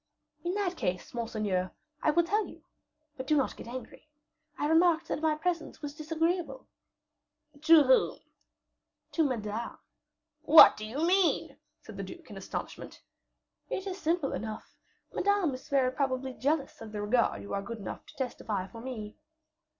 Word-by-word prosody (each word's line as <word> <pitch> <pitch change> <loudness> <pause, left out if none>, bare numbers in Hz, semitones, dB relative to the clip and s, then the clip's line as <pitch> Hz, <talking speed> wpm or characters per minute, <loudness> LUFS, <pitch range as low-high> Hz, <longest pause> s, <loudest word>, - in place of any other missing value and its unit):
"In 350 +2 -1
that 375 -4 -1
case, 180 0 -3
monseigneur, 210 -6 -1 0.3
I - - +2
will 340 +3 +4
tell 410 +5 0
you; - - -14 0.5
but 260 0 -6
do 305 - +3
not 275 - 0
get - - -10
angry. 255 +4 -9 0.5
I - - -1
remarked 325 0 +3
that - - -2
my 315 -1 +2
presence 330 -1 -3
was 290 -1 -4
disagreeable." 320 -1 -2 1.0
"To 320 -1 +7
whom?" 260 -1 +3 0.9
"To 325 - +2
Madame." 230 -4 -3 0.6
"What 320 - +9
do 215 - -6
you 280 +9 -1
mean?" 370 0 +2 0.3
said - - -11
the - - -4
duke - - -10
in - - -8
astonishment. - - -7 0.7
"It 380 - -3
is 385 -1 -5
simple 325 -2 0
enough; 215 0 -6 0.4
Madame 400 -6 +2
is 255 +3 -9
very 265 -3 +3
probably 260 -1 -1
jealous 280 +1 -1
of 220 -1 -8
the 210 - -3
regard 235 +3 +1
you - - -7
are 200 - -1
good 230 +3 -6
enough 200 - -7
to - - -15
testify 220 -7 -3
for 225 +4 -10
me." 220 -4 -7
275 Hz, 160 wpm, -30 LUFS, 230-330 Hz, 1.0 s, What